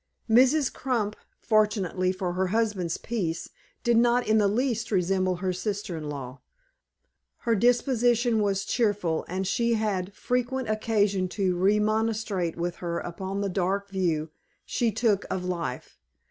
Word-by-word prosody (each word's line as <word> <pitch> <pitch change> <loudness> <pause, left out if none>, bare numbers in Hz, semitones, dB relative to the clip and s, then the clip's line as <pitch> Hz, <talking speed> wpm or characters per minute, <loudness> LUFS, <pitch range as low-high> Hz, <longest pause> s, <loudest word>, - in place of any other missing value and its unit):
Mrs. 260 +5 +4
Crump, 225 -6 -1 0.2
fortunately 205 -4 +1
for 185 -1 -3
her 185 +1 0
husband's 205 -4 0
peace, 175 -8 -3 0.3
did 235 -1 +3
not 240 +1 +3
in 220 0 +4
the 205 - +4
least 230 +1 0
resemble 185 -1 +1
her 185 +1 -2
sister 200 -1 -3
in 155 -2 -5
law. 135 -2 -7 1.0
Her 230 - +1
disposition 240 0 +3
was 200 -1 0
cheerful, 205 -9 0
and 185 +2 -2
she 235 +4 +1
had 200 -3 -2
frequent 250 +1 -1
occasion 205 -3 +1
to 190 -3 +1
remonstrate 210 -2 +1
with 175 +1 -2
her 170 -1 -3
upon 190 +4 -4
the 200 - -1
dark 195 +2 -1
view 165 -5 -1 0.3
she 235 -2 0
took 215 -2 +1
of 180 -1 -2
life. 170 -8 -4
200 Hz, 140 wpm, -27 LUFS, 185-225 Hz, 1.0 s, Mrs